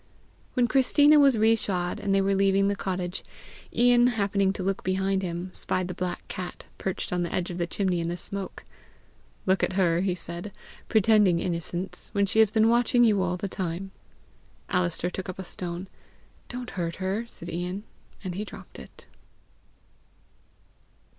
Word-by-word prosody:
When 245 -2 +3
Christina 290 +3 +5
was 275 -4 +5
re 220 +1 +5
shod, 180 -5 -1
and 200 - -2
they 195 - +4
were 195 +1 +2
leaving 195 0 +3
the 200 - 0
cottage, 185 -2 -3 0.5
Ian, 240 0 +5
happening 200 -4 +1
to 190 - -4
look 195 +1 -1
behind 190 +1 +1
him, 175 0 -4
spied 185 -1 -2
the 180 - -4
black 180 0 -4
cat 180 -1 -6
perched 190 -1 -3
on 180 - +1
the 170 - -2
edge 180 0 -1
of 175 - -5
the 170 - 0
chimney 185 -2 0
in 165 - -2
the 175 - -3
smoke. 195 +1 -6 0.8
"Look 190 0 +3
at - - +1
her," 175 -3 +3
he 185 -2 0
said, 170 +3 -7 0.4
"pretending 210 -4 +5
innocence, 175 +2 -4
when 200 -1 +3
she 210 +3 +1
has 220 -2 +7
been 220 +1 +3
watching 240 +1 +4
you 210 -4 +4
all 180 -1 0
the 200 - -3
time!" 185 0 -4 0.8
Alister 180 -1 0
took 185 0 -5
up 185 - -5
a 190 - -5
stone. 175 0 -5 0.6
"Don't 245 -1 -6
hurt 170 -2 -3
her," 195 +5 -2
said 170 - -9
Ian, 180 +3 -3 0.4
and 185 -2 -3
he 200 +4 -3
dropped 215 - -11
it. - - -13
190 Hz, 175 wpm, -27 LUFS, 180-210 Hz, 0.8 s, has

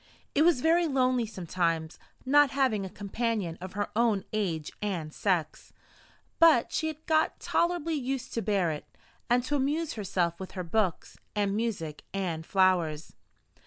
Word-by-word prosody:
It 290 - +3
was 325 -5 +4
very 335 +2 +3
lonely 255 -4 +2
sometimes 170 -4 -2 0.3
not 290 +2 +5
having 260 -7 +1
a 190 - -5
companion 205 -3 -2
of 185 0 -7
her 205 +1 -2
own 220 -4 +2
age 170 -8 -1
and 175 -7 -3
sex; 175 -6 -1 0.7
but 320 -8 +6
she 315 - 0
had 315 0 -6
got 315 0 +2
tolerably 340 -2 0
used 265 -2 -3
to 230 - -1
bear 195 -5 +1
it, 150 - -6 0.4
and 245 +1 +3
to 290 +3 -1
amuse 290 +4 0
herself 180 -5 -1
with 190 - -7
her 185 - -4
books, 185 0 -1 0.2
and 200 -1 +1
music, 195 -10 -3
and 170 -5 -3
flowers. 175 -5 +2
210 Hz, 155 wpm, -29 LUFS, 180-270 Hz, 0.7 s, but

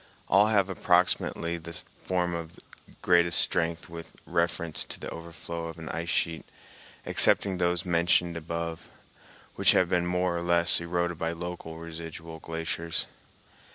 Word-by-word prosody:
All 100 +3 +6
have 100 -3 +3
approximately 90 -2 +1
the 85 0 -5 0.2
form 90 -1 0
of 85 +1 -6 0.5
greatest 85 -1 +4
strength 85 0 +2
with 85 0 -10
reference 85 -1 0
to - - -7
the - - -6
overflow 85 0 -6
of 80 0 -7
an 80 -1 -7
ice 85 0 -3
sheet, 80 +2 0 0.6
excepting 95 -2 +2
those 90 0 +1
mentioned 85 0 +2
above, 85 0 -5 0.7
which - - +5
have 90 - +3
been 90 -1 +1
more 90 0 0
or 85 - -2
less 85 0 +4
eroded 85 -1 -1
by 80 0 -1
local 85 -1 -6
residual 80 0 -8
glaciers. 80 0 -2
85 Hz, 140 wpm, -28 LUFS, 85-90 Hz, 0.7 s, All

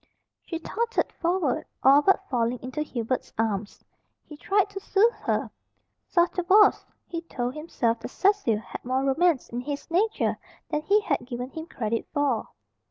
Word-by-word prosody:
She 330 - -4
tottered 460 +8 -1
forward, 345 -5 0 0.2
all 275 +2 +7
but 390 +3 +2
falling 240 -1 0
into 260 +4 -4
Hubert's 255 -4 -3
arms. 210 -2 -2 0.4
He 300 - -11
tried 390 +6 +1
to 395 - -5
soothe 420 +4 +3
her. - - -2 0.6
Sotto 350 0 +2
voce 400 +4 +5 0.2
he 335 -1 -5
told 250 -7 -4
himself 245 -7 -1
that 230 - -7
Cecil 395 - +2
had 220 - -8
more 260 +2 0
romance 290 +2 +2
in 240 +1 -4
his 285 +4 -6
nature 420 +6 +1 0.3
than 300 -1 0
he 405 +7 +3
had 280 -10 -1
given 250 +1 -5
him 320 0 -7
credit 230 -7 -3
for. 285 -6 +1
295 Hz, 160 wpm, -26 LUFS, 245-365 Hz, 0.6 s, all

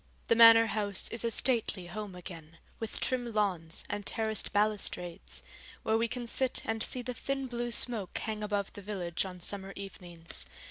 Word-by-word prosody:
The 230 - +6
Manor 230 0 +9
House 205 -3 +1
is 230 - -1
a 230 - +2
stately 225 -5 +2
home 195 +2 -6
again, 165 -3 -10 0.2
with 225 -1 -4
trim 245 -2 -1
lawns 185 -6 0
and 205 0 -3
terraced 220 +1 0
balustrades, 205 -4 -1 0.4
where 220 - +2
we 230 +1 +2
can 245 +1 -4
sit 255 +2 +1
and 225 0 -1
see 250 +2 -2
the 250 +1 -3
thin 270 +3 -2
blue 240 -1 -3
smoke 230 -5 0
hang 215 -1 -3
above 205 -2 -1
the 205 - -8
village 185 -4 -3
on 180 -1 -7
summer 195 +2 -5
evenings. 175 - -2
210 Hz, 175 wpm, -31 LUFS, 185-230 Hz, 0.4 s, Manor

